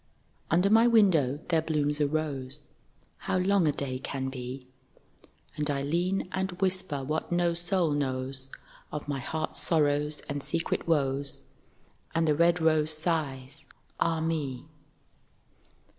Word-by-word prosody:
Under 180 +5 +3
my 225 +2 +6
window 170 - +4
there 165 -2 +3
blooms 150 -2 0
a 145 - +4
rose, 145 -2 -2 0.5
(How - - -1
long 185 -2 +3
a - - +4
day 130 -2 -3
can 135 0 -3
be.) 130 0 -6 0.9
And 150 0 -2
I 140 -1 0
lean 175 +6 0
and 190 0 -1
whisper 185 -6 -1
what 155 +5 -2
no 175 -1 +2
soul 175 -1 +1
knows 130 -1 -2 0.4
Of 150 -1 -5
my 140 -2 -2
heart's 155 +4 -3
sorrows 150 -2 +1
and 145 0 -5
secret 165 +4 -2
woes, 140 -3 0 0.7
And 165 0 +2
the 150 - +4
red 170 +3 +3
rose 155 -1 +3
sighs, 145 -4 -3 0.3
'Ah 165 -1 +1
me!' 150 -6 -2
155 Hz, 135 wpm, -29 LUFS, 140-170 Hz, 0.9 s, my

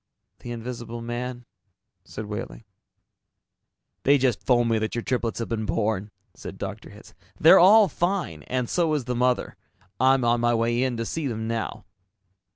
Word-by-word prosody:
"The 120 - -8
invisible 120 0 -6
man," 120 +1 -5 0.6
said 110 - -7
Wehling. 105 +2 -6 1.4
"They 140 +1 +4
just 130 -4 0
phoned 120 -2 +2
me 110 - +2
that 110 +1 -3
your 120 - -2
triplets 120 -3 -2
have 115 - -3
been 110 -2 -2
born," 105 -2 -1 0.2
said - - -9
Dr. - - -7
Hitz. - - -15 0.3
"They're - - +8
all 205 +4 +7
fine, 175 - -2
and 125 -1 -1
so 165 0 +1
is 140 -5 -2
the 125 - -2
mother. 125 +1 0 0.4
I'm 130 -1 +4
on 120 0 +2
my 120 0 +2
way 120 +1 +1
in 130 -2 0
to 115 - -3
see 155 +4 -3
them 110 -2 -4
now." 115 -1 -4
120 Hz, 165 wpm, -25 LUFS, 115-130 Hz, 1.4 s, They're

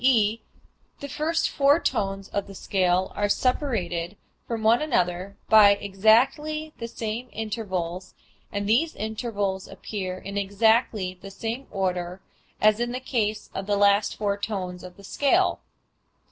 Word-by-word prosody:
e._, 225 -4 +4 0.6
the 285 - -6
first 320 +4 0
four 285 +3 +4
tones 195 - -1
of 200 - -2
the 195 - -10
scale 185 -1 +1
are 205 0 0
separated 205 - -1 0.3
from 230 -2 -3
one 230 +5 +4
another 185 - -1
by 210 -2 +8
exactly 265 +11 +2
the 230 - -4
same 230 +2 -5
intervals 190 -5 -4 0.4
and 200 0 -2
these 285 +10 +2
intervals 205 -3 -3
appear 185 -3 -5
in 200 +2 -4
exactly 200 -2 +1
the 195 - -8
same 225 +6 -5
order 180 -1 -2 0.4
as 215 +1 +4
in 240 0 -1
the 255 - -2
case 220 -5 -2
of 195 - -5
the 205 -1 +1
last 200 +1 +3
four 205 -1 0
tones 185 -4 -4
of 180 -1 -11
the 200 - -14
scale. 295 - +2
210 Hz, 145 wpm, -25 LUFS, 195-235 Hz, 0.6 s, by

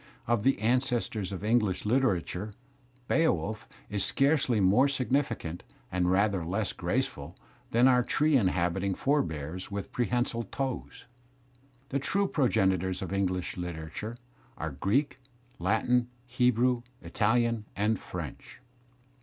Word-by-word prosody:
Of 120 -2 +1
the 135 +5 +3
ancestors 120 -4 0
of 95 0 -5
English 105 -4 +1
literature 105 -4 0 0.5
"Beowulf" 110 - 0 0.2
is 105 -1 0
scarcely 135 -5 +2
more 100 +8 +5
significant, 125 - -1 0.3
and 90 -1 +1
rather 95 -1 +2
less 95 +4 -2
grace - - 0
ful, - - -10 0.3
than 120 +3 +4
our 125 -1 +5
tree 150 +4 +2
inhabiting 95 -3 +1
forebears 90 - -1
with 100 -1 -5
prehensile 120 -1 0
toes; 130 +4 -5 0.8
the 140 - 0
true 200 +8 +1
progenitors 95 - +1
of 95 - -5
English 95 -2 -1
literature 90 +6 -5 0.4
are 80 0 -3
Greek, 115 - 0 0.4
Latin, 120 +2 +2 0.2
Hebrew, 125 0 +2 0.2
Italian, 115 0 +1
and 105 +1 +1
French. 85 -6 -8
110 Hz, 115 wpm, -29 LUFS, 95-125 Hz, 0.8 s, more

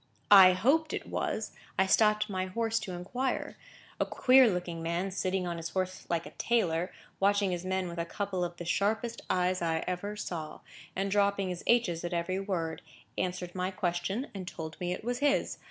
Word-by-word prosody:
I 190 -2 +10
hoped 280 - +2
it - - -3
was, - - -2 0.3
I 190 - +4
stopped 210 +2 +4
my 185 -2 -2
horse 225 +3 0
to 185 - -6
inquire. 245 +9 -2 0.4
A - - +2
queer 255 -1 +6
looking 175 -3 -3
man, 170 +4 -1
sitting 185 0 -1
on 170 -1 -3
his 165 0 -4
horse 185 0 -3
like 170 0 0
a - - -9
tailor, 180 -7 +1 0.3
watching 200 0 +3
his 175 -1 -3
men 190 0 -1
with 170 0 -6
a 170 - -1
couple 190 0 -2
of 175 0 -4
the 175 - -6
sharpest 220 +6 0
eyes 180 0 +1
I 165 -1 0
ever 190 +3 -3
saw, 170 -6 -5 0.3
and 195 +1 -1
dropping 200 -1 +2
his 180 -1 -5
h's 210 -9 +2
at 175 +1 -3
every 175 +2 -1
word, 170 -5 -2 0.3
answered 180 -1 -3
my 185 0 -1
question, 190 +5 -2
and 190 -3 -6
told 160 -3 -6
me 180 0 -2
it 180 - -4
was 245 +2 -2
his. 285 -1 +1
185 Hz, 190 wpm, -30 LUFS, 175-205 Hz, 0.4 s, I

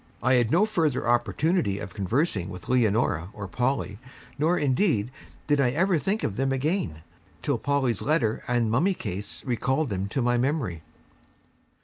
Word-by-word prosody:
I 130 +2 +4
had 120 -3 +3
no 180 - +4
further 160 - 0
opportunity 120 - +1
of 100 -3 -7
conversing 100 - 0
with 90 -2 -9
Leonora 110 -8 +1
and 100 -3 -6
Polly, 125 -5 -1 0.4
nor 165 +4 +3
indeed 130 - +1 0.3
did 145 -1 +2
I 125 - +3
ever 170 +5 +2
think 205 +7 -1
of 100 - -2
them 135 +1 +1
again, 135 - -1 0.4
till 140 -6 0
Polly's 135 -6 0
letter 135 -8 +1
and 120 -3 +1
mummy 175 - +2
case 100 - -6
recalled 130 +4 0
them 95 -1 -2
to 120 +5 -1
my 120 0 +2
memory. 125 - -1
125 Hz, 155 wpm, -26 LUFS, 105-150 Hz, 0.4 s, I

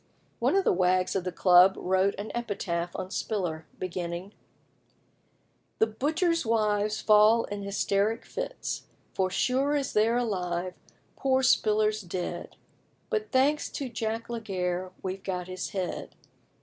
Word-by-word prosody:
One - - +2
of 390 - +4
the - - +3
wags 185 +1 +2
of 185 -2 -1
the 180 - -1
club 180 +1 +6
wrote 190 +2 +1
an 205 +2 -5
epitaph 190 -7 -3
on 185 - -5
Spiller, 175 -9 -2
beginning 180 +1 -4 1.4
"The - - +4
butchers' 315 - 0
wives 215 -2 +1
fall 215 +2 +5
in 205 0 -5
hysteric 200 +2 0
fits, - - -5 0.3
For 185 -1 +1
sure 265 +8 +1
as 280 -2 -1
they're 225 +3 +3
alive, 180 -6 -1 0.4
poor 265 -1 +1
Spiller's 215 -3 +3
dead; 180 -1 -5 0.6
But, 435 -2 -1
thanks 285 +3 +2
to 275 -3 -3
Jack 225 0 -3
Laguerre, 185 -6 -3
we've 190 0 -4
got 180 -2 -3
his 185 0 -4
head. 190 -2 -4
205 Hz, 135 wpm, -28 LUFS, 185-230 Hz, 1.4 s, club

